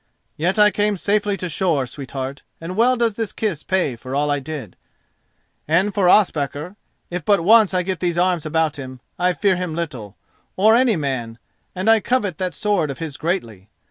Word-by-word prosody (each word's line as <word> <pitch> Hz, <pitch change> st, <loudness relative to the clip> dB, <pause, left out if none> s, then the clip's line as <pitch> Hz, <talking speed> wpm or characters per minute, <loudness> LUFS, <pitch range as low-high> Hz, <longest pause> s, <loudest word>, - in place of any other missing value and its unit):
"Yet 180 Hz, +6 st, 0 dB
I 210 Hz, 0 st, +6 dB
came 205 Hz, -1 st, 0 dB
safely 205 Hz, +1 st, 0 dB
to 180 Hz, -, -4 dB
shore, 165 Hz, -5 st, 0 dB
sweetheart, 135 Hz, +1 st, -6 dB, 0.2 s
and 170 Hz, +3 st, -6 dB
well 245 Hz, +4 st, +3 dB
does 230 Hz, -2 st, +1 dB
this 225 Hz, 0 st, -3 dB
kiss 200 Hz, -9 st, -2 dB
pay 175 Hz, -9 st, 0 dB
for 130 Hz, +3 st, -7 dB
all 145 Hz, +1 st, +1 dB
I 145 Hz, -, +1 dB
did. 140 Hz, -, -7 dB, 0.9 s
And 170 Hz, +6 st, +2 dB
as -, -, -9 dB
for 185 Hz, -3 st, +3 dB
Ospakar, 160 Hz, -3 st, +1 dB, 0.4 s
if 175 Hz, -1 st, -3 dB
but 200 Hz, -2 st, +2 dB
once 220 Hz, +1 st, +6 dB
I 180 Hz, -, +2 dB
get 185 Hz, -1 st, -3 dB
these 175 Hz, -1 st, -1 dB
arms 175 Hz, -2 st, +1 dB
about 160 Hz, -1 st, 0 dB
him, 130 Hz, -1 st, -8 dB, 0.2 s
I 180 Hz, 0 st, +2 dB
fear 195 Hz, -1 st, +1 dB
him 180 Hz, -3 st, -3 dB
little, 125 Hz, -, -5 dB, 0.4 s
or 215 Hz, +4 st, +5 dB
any 245 Hz, -3 st, +3 dB
man, 130 Hz, -7 st, -3 dB, 0.4 s
and 185 Hz, +3 st, -3 dB
I 225 Hz, 0 st, +6 dB
covet 210 Hz, -7 st, -1 dB
that 185 Hz, -2 st, -2 dB
sword 205 Hz, -8 st, 0 dB
of 140 Hz, -, -5 dB
his 160 Hz, -4 st, -6 dB
greatly. 115 Hz, -, -3 dB
175 Hz, 195 wpm, -21 LUFS, 145-205 Hz, 0.9 s, I